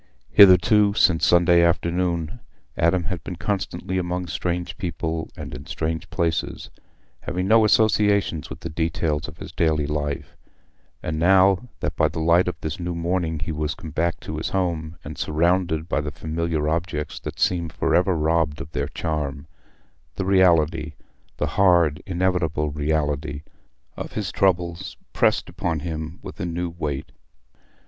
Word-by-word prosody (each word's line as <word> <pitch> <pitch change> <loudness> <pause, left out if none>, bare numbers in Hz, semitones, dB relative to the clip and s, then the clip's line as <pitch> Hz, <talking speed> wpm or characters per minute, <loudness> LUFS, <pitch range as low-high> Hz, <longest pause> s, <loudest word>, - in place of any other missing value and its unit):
Hitherto, 100 +1 +6
since 80 -6 +4
Sunday 85 0 +5
afternoon, 85 +2 0 0.4
Adam 85 +2 +2
had 90 +1 -4
been 90 - -5
constantly 95 +1 -2
among 90 0 -2
strange 90 0 -3
people 80 -2 -3
and - - -7
in 65 +5 -8
strange 80 0 -3
places, 85 -4 -2 0.5
having 90 +1 -3
no 110 +1 +6
associations 105 -6 +2
with 65 - -9
the 85 - -5
details 80 -1 -1
of 75 +1 -11
his - - -9
daily 80 -3 +1
life, 75 -1 -3 0.7
and 80 0 -2
now 95 +6 +4
that - - -2
by - - +3
the - - -7
light 85 +3 +4
of 90 - -3
this 80 +1 -4
new 85 0 -3
morning 85 -1 -1
he 80 - -4
was 75 0 -2
come 80 - -9
back 85 +1 -1
to 75 - -6
his 80 - -2
home 85 -4 -2
and 75 0 -8
surrounded 85 +1 +1
by 75 - 0
the 75 - -4
familiar 80 +1 -2
objects 80 -2 -2
that - - -7
seemed 85 -3 +1
for - - -1
ever 90 +1 +3
robbed 80 -2 +1
of 75 - -8
their 70 -2 -2
charm, 75 -3 -3 0.7
the 95 - -2
reality—the 85 -4 +1
hard, 85 -6 +3
inevitable 90 -5 0
reality 75 0 -1 0.5
of - - -7
his 105 -4 -3
troubles 90 -1 0 0.2
pressed - - +2
upon 85 -4 -3
him 80 +1 -5
with - - -9
a 90 - -2
new 85 0 -3
weight. 75 -4 -4
85 Hz, 155 wpm, -23 LUFS, 80-90 Hz, 0.7 s, Hitherto